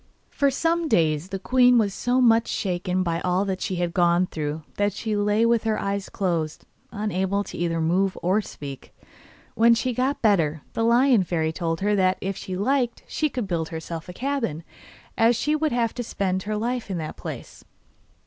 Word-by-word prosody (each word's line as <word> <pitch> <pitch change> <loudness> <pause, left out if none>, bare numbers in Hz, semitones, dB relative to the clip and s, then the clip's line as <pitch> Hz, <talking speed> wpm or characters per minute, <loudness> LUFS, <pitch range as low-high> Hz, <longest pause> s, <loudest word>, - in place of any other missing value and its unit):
For 280 - +2
some 330 +4 0
days 160 - +1
the 195 - -3
queen 250 +4 +4
was 205 -4 +2
so 245 +5 0
much 230 -2 +4
shaken 185 -1 -1
by 170 -2 -1
all 185 +2 0
she 185 - -2
had 175 -1 -2
gone 175 0 +3
through 155 -2 -4
that 205 -1 +1
she 215 +1 -3
lay 210 +2 +2
with 230 -1 +2
her 220 -1 0
eyes 200 0 -3
closed, 165 -5 -2 0.3
unable 200 -1 -1
either 170 -1 -2
to 165 - -1
move 185 +4 +1
or 190 +5 +2
speak. 140 -8 -9 0.6
When 230 +1 +5
she 250 +2 -1
got 260 +4 -1
better, 165 -8 +2
the - - -2
Lion 240 -1 +4
Fairy 160 -2 -1
told 165 0 -3
her 205 +1 +2
that 185 -1 +2
if 195 0 -3
she 185 -1 -5
liked 245 +3 0
she 305 - 0
could 245 -6 -4
build 165 -3 -2
herself 160 +1 -6
a - - -7
cabin, 230 - -2 0.6
as 230 +1 +5
she 300 +7 0
would 310 0 0
have 235 -2 0
to 245 - -4
spend 190 -4 -1
her 210 +2 -3
life 240 +1 -2
in 190 - -2
that 155 -2 -5
place. - - -8
200 Hz, 190 wpm, -24 LUFS, 175-235 Hz, 0.6 s, When